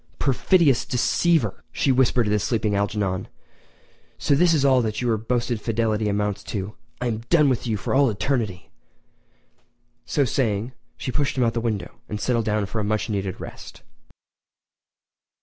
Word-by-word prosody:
"Perfidious 145 0 +3
deceiver!" 165 +6 +1
she 135 - +1
whispered 125 -2 +3
at 105 - 0
the 105 - +2
sleeping 110 0 0
Algernon, 100 -2 -1 0.9
"so - - +1
this 170 +4 +4
is 150 -4 +2
all 130 -2 +5
that 110 -2 -2
your 120 -2 +1
boasted 120 +1 -1
fidelity 110 -1 0
amounts 105 0 -1
to! 100 0 -4 0.3
I 125 - -3
am 115 -3 -1
done 150 -4 +5
with 125 -1 -1
you 110 -2 0
for - - -3
all 135 -1 +4
eternity!" 110 -4 -2 1.4
So 145 -3 +2
saying, 115 -2 -1 0.3
she 130 - -4
pushed 140 +1 -1
him 125 - +3
out 115 -1 +1
the 115 - -1
window 110 -6 -3
and 105 - -4
settled 115 -1 0
down 105 -1 0
for 105 +3 -4
a - - -2
much 110 +1 -1
needed 95 -3 -3
rest. - - -10
115 Hz, 165 wpm, -23 LUFS, 105-130 Hz, 1.4 s, all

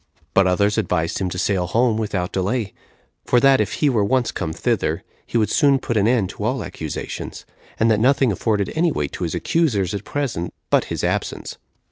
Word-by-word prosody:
But 95 -1 +4
others 100 +3 +2
advised 80 -2 -1
him 95 -2 -1
to 90 - -5
sail 90 -1 0
home 115 +3 +2
without 100 -5 -2
delay; 100 +2 -1 0.5
for 125 - +3
that 135 -1 +5
if 105 - -2
he 150 - +1
were 120 -7 +2
once 125 +4 +1
come 80 - -3
thither, - - -1 0.2
he - - -1
would 110 -2 +1
soon 140 -3 +4
put 120 -2 -3
an 105 -1 +3
end 115 -6 +2
to - - -8
all 125 +1 -1
accusations, 80 -2 -6 0.3
and 115 0 +4
that 105 - +3
nothing 130 0 +3
afforded 100 +1 0
any 165 +1 +2
weight 75 - -2
to - - -5
his - - -3
accusers 110 - +1
at 100 - -4
present 125 - -3 0.2
but - - +4
his - - -4
absence. - - -2
110 Hz, 200 wpm, -21 LUFS, 95-125 Hz, 0.5 s, that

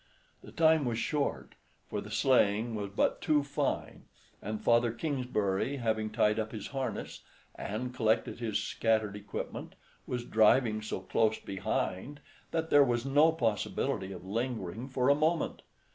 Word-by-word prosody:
The - - -11
time 160 -2 +4
was 120 -2 -1
short, 145 +4 -2 0.3
for - - -3
the - - -9
sleighing 115 -3 +2
was 105 -2 -3
but 100 - 0
too 150 -2 +2
fine; 140 - -3 0.4
and 105 +1 -4
Father 120 0 +3
Kingsbury, 125 -3 -1
having 110 -3 -1
tied 105 +1 +2
up 110 0 -2
his 105 -3 -5
harness, 130 -6 -4 0.3
and 125 +5 -4
collected 115 -2 +1
his 115 -3 -1
scattered 110 -2 0
equipment, 105 0 -6 0.3
was 120 -1 -3
driving 110 0 +4
so 105 -3 -4
close 110 +3 +1
behind 95 +7 -3 0.3
that 160 -1 -2
there 145 0 +8
was 120 -2 0
no 145 +4 +5
possibility 105 -7 -1
of 90 -1 -9
lingering 115 0 -3
for 130 -1 0
a 140 - +7
moment. 155 +3 0
115 Hz, 145 wpm, -31 LUFS, 105-135 Hz, 0.4 s, there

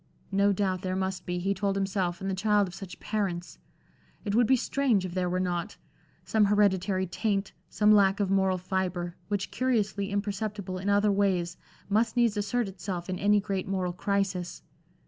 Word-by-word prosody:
No 200 +1 +3
doubt 190 -2 0
there 185 -1 -2
must 190 0 -3
be, 180 0 -1
he 195 +3 0
told 200 0 -1
himself, 190 -2 -1
in - - -2
the 195 - 0
child 205 +1 +2
of 180 - -9
such 180 -1 -9
parents, 190 -5 -3 0.7
it 200 - -1
would 235 +1 +4
be 265 - +5
strange 250 -5 +1
if 180 - -5
there 180 -1 0
were 180 +1 0
not 175 -2 -2 0.5
some 215 -2 +3
hereditary 200 -2 +2
taint, 195 +1 -1 0.2
some 210 0 +3
lack 200 -1 +5
of 200 -2 0
moral 190 -1 +2
fibre, 180 -1 -2
which 205 -2 -2
curiously 210 -6 0
imperceptible 200 -2 -3
in 195 +2 -2
other 205 +1 +4
ways, 190 -4 +1 0.3
must 220 +4 +1
needs 235 -3 +3
assert 210 +3 0
itself 185 -1 -5
in 185 - -3
any 205 +1 +4
great 195 -2 -3
moral 185 -2 -1
crisis. 195 -1 -2
195 Hz, 180 wpm, -28 LUFS, 185-205 Hz, 0.7 s, be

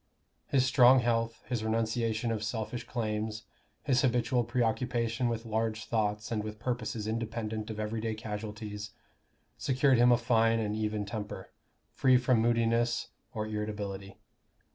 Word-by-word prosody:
His 130 -2 +3
strong 130 0 +6
health, 115 -1 0
his 120 -3 -2
renunciation 115 +1 0
of 110 -1 -2
selfish 110 +1 -3
claims, 110 -2 -2 0.4
his 130 -4 +3
habitual 125 0 +2
preoccupation 120 0 0
with 115 0 -3
large 110 -1 -1
thoughts 105 -1 -1
and 110 -2 -1
with 105 0 -6
purposes 115 -2 -3
independent 110 -1 -3
of 110 -1 -5
everyday 110 +1 -2
casualties, 105 -1 -6 0.7
secured 135 -1 +3
him 120 +1 +6
a 120 - +6
fine 115 -1 +3
and 105 -2 -1
even 105 -1 -1
temper, 105 0 -6 0.4
free 130 -1 +4
from 125 -1 +3
moodiness 115 0 +1 0.3
or 110 -1 -1
irritability. 105 -2 -4
115 Hz, 135 wpm, -30 LUFS, 110-120 Hz, 0.7 s, strong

